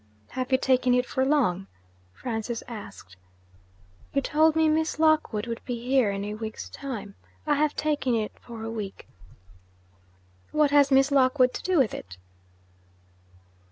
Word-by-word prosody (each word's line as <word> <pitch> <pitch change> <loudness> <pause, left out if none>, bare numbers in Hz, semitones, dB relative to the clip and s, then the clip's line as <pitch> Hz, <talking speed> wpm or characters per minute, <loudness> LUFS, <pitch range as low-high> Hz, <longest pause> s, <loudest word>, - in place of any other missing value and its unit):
'Have 255 0 -4
you 260 - +5
taken 255 -1 +2
it 250 0 +2
for 260 - -1
long?' 240 -10 +1 0.4
Francis 230 - -4
asked. 210 - -10 1.0
'You - - +4
told 315 +1 +3
me 320 0 +4
Miss 315 0 +1
Lockwood 310 -9 +2
would 230 -1 -5
be 245 -2 -4
here 250 -2 +2
in 200 0 -3
a 210 - -4
week's 220 0 -6
time. 235 -7 -7 0.3
I 300 - +2
have 295 0 +1
taken 295 -5 0
it 215 -2 -1
for 230 -2 -9
a 225 - -4
week.' 210 -4 -6 1.4
'What 300 -2 +3
has 285 -1 +5
Miss 270 +1 +4
Lockwood 255 -1 +4
to - - -5
do 370 -1 0
with 260 -7 +3
it?' 95 0 -8
255 Hz, 155 wpm, -26 LUFS, 225-290 Hz, 1.4 s, you